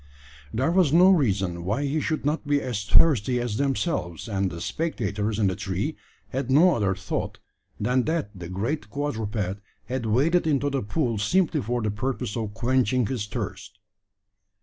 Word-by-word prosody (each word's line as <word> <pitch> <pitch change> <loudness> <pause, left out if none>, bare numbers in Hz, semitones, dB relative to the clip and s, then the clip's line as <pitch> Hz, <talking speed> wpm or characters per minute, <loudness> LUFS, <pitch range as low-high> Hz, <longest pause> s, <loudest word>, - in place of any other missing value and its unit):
There 130 +8 +1
was 175 -5 +3
no 180 +4 +7
reason 95 - +1
why 105 +10 -1
he 145 +2 0
should 155 -2 -2
not 150 +1 -1
be 145 0 +3
as 120 -6 -3
thirsty 125 -3 +4
as 120 -3 -2
themselves; 135 - -1
and 100 -3 0
the 85 - -7
spectators 105 - -2
in 110 - +2
the 95 -1 +1
tree 100 - -3 0.3
had 130 -1 -3
no 165 +7 +6
other 100 -4 +1
thought, - - -4 0.4
than 125 +4 +1
that 160 -10 -1
the 90 -3 -8
great 110 +7 -3
quadruped 110 -8 -3 0.2
had 125 +1 -3
waded 160 +10 +2
into 145 -1 +1
the 135 -1 0
pool 115 +1 -1
simply 160 - +2
for 120 +1 -2
the 105 - 0
purpose 120 0 -3
of 110 -3 -4
quenching 125 0 +2
his 105 -2 -3
thirst. 105 0 -6
120 Hz, 170 wpm, -25 LUFS, 105-145 Hz, 0.4 s, no